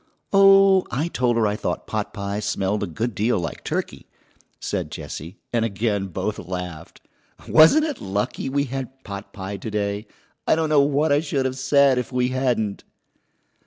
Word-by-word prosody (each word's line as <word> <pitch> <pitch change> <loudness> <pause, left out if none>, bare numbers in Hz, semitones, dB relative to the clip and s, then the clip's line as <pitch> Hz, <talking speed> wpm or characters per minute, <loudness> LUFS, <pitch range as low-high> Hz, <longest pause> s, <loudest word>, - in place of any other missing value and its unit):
"Oh, 195 -1 +6
I 150 +7 -1
told 125 -6 +1
her 115 - +3
I 105 0 +1
thought - - -3
potpie 100 -1 -3
smelled 100 0 -1
a 100 - -1
good 110 +8 -3
deal 110 +4 +1
like 85 - -5
turkey," - - -4 0.5
said - - -3
Jessie, 85 +7 -7 0.2
and 115 -1 +2
again 105 -2 -1
both 95 +3 -3
laughed. 90 -2 -7 0.5
"Wasn't 165 - +6
it 300 -4 -4
lucky 100 +7 -2
we 140 +1 +1
had 135 -1 -4
potpie 100 0 -7
to - - -4
day? 105 0 -2 0.4
I - - +5
don't 160 -1 0
know 150 -2 +5
what 145 +2 +2
I 145 - +4
should 145 -4 -1
have 130 0 -2
said 135 -1 +4
if 125 - -5
we 125 0 +1
hadn't." 125 -6 -1
115 Hz, 165 wpm, -23 LUFS, 100-140 Hz, 0.5 s, Oh